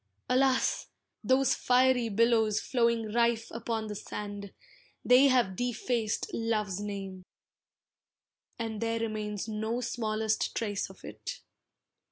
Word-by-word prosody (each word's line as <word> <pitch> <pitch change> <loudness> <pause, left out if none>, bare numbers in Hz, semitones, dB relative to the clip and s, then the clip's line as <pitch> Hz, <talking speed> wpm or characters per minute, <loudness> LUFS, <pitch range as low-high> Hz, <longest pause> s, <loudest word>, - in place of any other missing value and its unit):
Alas! 260 0 +2 0.4
those 260 +1 +3
fiery 250 -1 +3
billows 220 0 +3
flowing 235 -3 0
rife 235 -1 +1
Upon 230 -1 -3
the 210 - -5
sand, 205 -1 -6 0.5
they 255 +3 +7
have 245 -8 +3
defaced 240 -1 -1
love's 215 -4 -1
name, 195 -2 -5 1.3
And 225 -2 -4
there 230 0 0
remains 215 -2 -3
no 220 +2 -2
smallest 220 -2 -1
trace 205 -3 -2
of - - -14
it. - - -7
225 Hz, 110 wpm, -30 LUFS, 210-240 Hz, 1.3 s, they